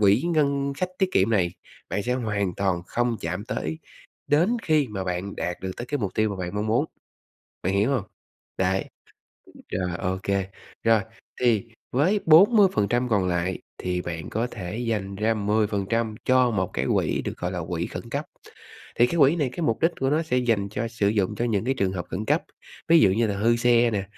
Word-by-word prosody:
quỹ 105 +4 +4
ngân 140 -2 +1
sách 185 - 0
tiết 190 - +2
kiệm 95 +4 +3
này, 95 -5 +3 0.4
bạn 100 - -2
sẽ 125 - -1
hoàn 105 -7 -1
toàn 95 -3 0
không 120 -1 0
chạm 90 +5 -3
tới 160 +7 -3 0.5
đến 175 +11 +3
khi 155 -4 +2
mà 95 -2 -4
bạn 90 +2 -3
đạt 90 0 -2
được 95 - -3
tới 120 - -6
cái 145 +2 -2
mục 100 -5 -3
tiêu 110 -1 +2
mà 100 - -4
bạn 90 -1 -4
mong 105 +1 -1
muốn, 110 +2 +2 0.8
bạn 95 - 0
hiểu 105 +6 +2
hông? 125 -8 0 0.5
Đấy, 95 +1 +1 0.9
rồi, 90 -1 -1
ô 95 +1 -1
kê. 100 -1 0 0.4
Rồi, 115 -1 +5 0.4
thì 120 -3 +2 0.3
với 175 +11 +2
40% 160 - +5
còn 100 -5 +2
lại 90 +1 -1 0.2
thì 90 -1 -2
bạn 85 -2 -5
có 115 +3 -1
thể 95 +1 -6
dành 105 -5 -2
ra 110 +2 +1
10% 105 +1 0
cho 130 -1 +4
một 95 -5 -1
cái 65 +2 -1
quỹ - - 0
được - - -5
gọi 90 - -2
là 90 - -3
quỹ 85 -1 -2
khẩn - - -8
cấp. - - -2 0.7
Thì 120 - +5
cái 170 - -3
quỹ 145 +4 +6
này, 145 -5 +1
cái 170 - -6
mục 115 -7 0
đích 165 - +5
của 135 +1 +1
nó 155 +2 +2
sẽ 140 -6 0
dành 115 -5 +1
cho 115 +2 -2
sử 115 -3 0
dụng 100 -3 +1
cho 120 - -1
những 110 -4 0
cái 130 +2 +1
trường 95 -5 0
hợp 90 -2 -4
khẩn 105 +3 -3
cấp, - - +2 0.5
ví 165 0 +7
dụ 100 - +6
như 115 +4 +2
là 100 - -1
hư 115 +3 +3
xe 120 0 +4
nè, 100 -3 -1
110 Hz, 210 wpm, -25 LUFS, 95-125 Hz, 0.9 s, ví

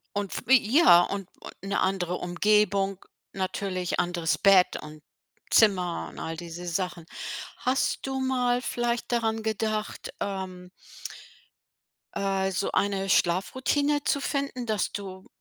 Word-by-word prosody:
Und 205 +2 -3
wie 265 +1 +7 0.2
ja, 175 - +8
und, 195 0 -4 0.3
äh, - - -8
'ne 200 - 0
andere 180 -2 0
Umgebung, 195 +1 +1 0.3
natürlich 185 -1 -2
anderes 175 -2 0
Bett 195 -2 +5
und 150 0 -11 0.5
Zimmer 185 -6 +3
und - - -13
all 165 0 -4
diese 175 +1 -8
Sachen. 175 -1 -3 0.5
Hast 260 +2 0
du 265 0 -2
mal 250 -2 +1
vielleicht 240 -1 -2
daran 225 -2 0
gedacht, 215 -1 -3
ähm 185 -2 -5 1.5
äh, 195 -1 0
so 195 - -1
eine 195 -1 0
Schlafroutine 260 +12 +1
zu 280 - +1
finden. 275 -3 -2
Dass 215 -3 -1
du 190 -2 -7
195 Hz, 125 wpm, -27 LUFS, 180-230 Hz, 1.5 s, ja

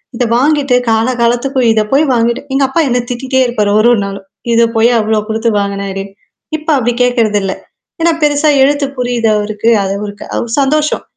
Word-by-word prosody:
இத 245 - -1
வாங்கிட்டு, 280 -1 +2
கால 225 +1 +2
காலத்துக்கு 245 +3 0
இத 220 - +2
போய் 290 +3 +4
வாங்கிட்டு 235 +1 0
எங்க 275 +1 +2
அப்பா 300 +6 0
என்ன 245 0 +1
திட்டிட்டே 260 +1 -1
இருப்பாரு 210 -4 0
ஒரு, 220 - +4
ஒரு 220 - +1
நாளும். 195 -1 -8 0.3
இத 230 0 +4
போய் 230 +2 +4
அவ்ளோ 215 0 0
குடுத்து 225 +1 0
வாங்கனாரு. 200 -1 -3 0.5
இப்ப 310 +1 -9
அப்பிடி 245 -1 0
கேட்கிறதில்ல்ல. 215 -6 +1 0.5
ஏன்னா, 335 +1 +3
பெருசா 295 +1 +2
எழுத்து 285 +1 +1
புரியுது 245 -2 0
அவருக்கு. 210 +1 -1
அது 195 0 -2
ஒருக் 205 -1 -8
அவரு - - -9
அவ - - -2
சந்தோஷம். 300 +2 0
235 Hz, 175 wpm, -13 LUFS, 215-270 Hz, 0.5 s, போய்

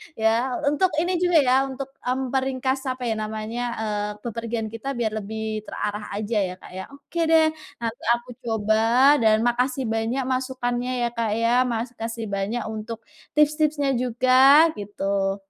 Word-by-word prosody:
Ya 230 +3 +1 0.2
untuk 370 +6 +3 0.2
ini 360 - -1
juga 355 -2 +3
ya, 255 0 +3
untuk, 270 0 -6
mmm, 255 0 -2
peringkas 265 0 0
apa 255 -1 -3
ya 225 -2 0
namanya, 215 +2 -4 0.2
eee, 210 -1 -1 0.2
bepergian 230 -1 -4
kita 230 +4 -8
biar 230 -2 -1
lebih 215 +1 -5
terarah 210 0 -4
aja 215 +1 -2
ya 180 - -6
Kak - - -12
ya, 190 - -4
oke 340 +4 -7
deh, 320 0 +5 0.4
nanti 230 +1 -4
aku 240 +1 -11
coba 220 -3 0 0.4
dan 220 -1 +3
makasih 250 +2 +1
banyak 225 +3 -1
masukannya 255 -1 -2
ya - - +2
Kak 230 -2 -2
ya, 230 +1 +1 0.2
makasih 230 -1 -4
banyak 200 +4 -2
untuk 220 +1 -6 0.3
tips-tipsnya 300 -1 +2
juga, 255 +6 +5
gitu. 195 -1 -1
235 Hz, 150 wpm, -24 LUFS, 220-260 Hz, 0.4 s, deh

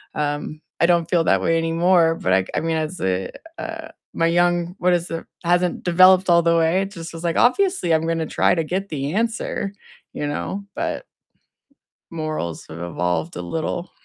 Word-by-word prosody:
Um, 150 +1 -3 0.2
I 170 - +5
don't 170 -1 +2
feel 170 -2 +3
that - - +3
way 165 0 +2
anymore, 165 0 +3
but 95 - -2
I 95 - +4
g - - -15
I - - +2
mean, 165 0 -1
as 160 +3 -3
a, 95 0 -1 0.3
uh, 325 -1 -6 0.2
my 165 - +1
young 175 +1 +1
what 180 0 +3
is 175 0 -1
it 165 - -4 0.2
hasn't 175 +1 +1
developed 185 +1 +5
all 170 0 +6
the 170 0 +2
way. 165 +3 +2
It 195 +1 -4
just 165 -3 -8
was 165 +1 -8
like, 165 - 0
"Obviously, 310 - +2
I'm 160 +1 +1
gonna 165 -1 0
try - - +2
to 165 - 0
get 190 +5 -3
the 145 +1 -3
answer." 225 -2 -2 0.4
You 145 - -3
know, 195 +7 -4
but 330 +9 -3 1.1
morals 155 - -4
have 80 +1 -9
evolved 85 -1 -2
a 90 - -4
little. 165 - -4
165 Hz, 190 wpm, -22 LUFS, 155-180 Hz, 1.1 s, all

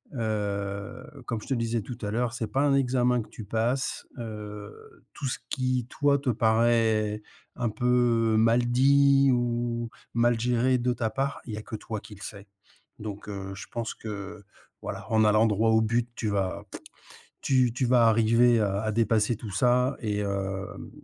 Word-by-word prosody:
heu, 105 +1 -3 0.2
comme 115 -3 -3
je - - -12
te 135 - 0
disais 115 -1 -1
tout 120 +4 -8
à 105 - -3
l'heure, 120 +1 -1
c'est 115 -2 -3
pas 135 - 0
un 140 -1 +3
examen 125 -2 +2
que - - -11
tu 110 - -9
passes, 115 +5 -1
heu, 105 -2 -9
tout 140 - -4
ce - - -2
qui, 130 -3 -1
toi, 145 -1 +2
te 135 -2 -2
paraît 110 -1 +2 0.3
un 120 -2 -1
peu 115 -1 +2
mal 115 +2 +4
dit 140 +2 +4
ou 120 -1 -1 0.3
mal 120 0 +3
géré 125 +2 +2
de 125 +1 +1
ta 115 -2 -1
part, 135 +4 -2
il 115 - -6
y - - -4
a - - -5
que 110 - -7
toi 110 0 -5
qui 105 0 -12
le 100 - -16
sais. 100 -2 -8 0.5
Donc 105 -1 -7
heu, 95 -1 -6
je 95 - -9
pense 115 -1 -3
que, 105 -1 -7 0.4
voilà, - - -6
en 110 -1 +4
allant 105 +1 +4
droit 110 +2 +2
au 110 0 +4
but, 120 +2 0
tu 110 - -2
vas 95 -2 -1
pout, - - -8 0.6
tu 130 -3 +3
tu 130 0 0
vas 120 -2 +5
arriver 115 +1 +4
à 100 -1 0
à 110 -1 -1
dépasser 110 0 +2
tout 105 -2 -8
ça 125 +5 +2
et 105 -3 -2
hem 100 -1 -4
115 Hz, 185 wpm, -27 LUFS, 105-125 Hz, 0.6 s, vas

